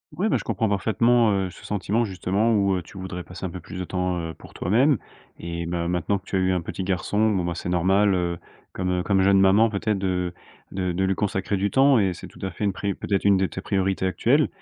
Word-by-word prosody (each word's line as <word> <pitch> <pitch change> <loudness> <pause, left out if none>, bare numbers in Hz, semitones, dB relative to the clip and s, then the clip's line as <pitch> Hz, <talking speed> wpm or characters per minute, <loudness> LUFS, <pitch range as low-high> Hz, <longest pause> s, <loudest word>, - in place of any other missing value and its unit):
Ouais, 210 +4 0
bah, - - +2
je - - -9
comprends 110 -3 0
parfaitement, 115 +3 +3
heu, 95 -2 0
ce - - -14
sentiment 105 +3 0
justement, 100 +3 0
où, 100 -2 +2
heu, 90 - -3
tu 85 - -14
voudrais 90 -1 -6
passer 90 +1 -7
un - - -2
peu 90 - -7
plus 85 - -9
de 90 - -3
temps, 90 0 -2
heu, 80 -1 -5
pour - - -15
toi-même. 125 - +2 0.4
Eh 85 0 -5
bah, 85 0 -2
maintenant 90 +3 0
que 95 - -14
tu 95 - -2
as - - +2
eu 95 0 +2
un 90 - 0
petit 90 +2 -5
garçon, 105 +3 +1
bon, 95 -4 0
ben, 85 0 -2
c'est 85 - -6
normal, 95 +3 +3
heu, 85 -1 -1 0.3
comme 90 -1 -1
comme 95 -1 +2
jeune 95 0 +5
maman 100 +4 +5
peut-être 105 0 -1
de 90 -2 -1 0.4
de 90 -2 -2
de 95 +2 0
lui 95 - +2
consacrer 95 0 -1
du 100 +2 0
temps, 135 -2 +5
et 95 -3 +1
c'est 85 - -10
tout - - -17
à 95 - -2
fait 90 - -6
une 100 - +2
pri 100 +1 -2
peut-être 100 0 -2
une 100 -1 +6
de 95 0 +2
tes 95 - -7
priorités 95 -1 0
actuelles, 130 +10 +2
95 Hz, 255 wpm, -24 LUFS, 90-105 Hz, 0.4 s, une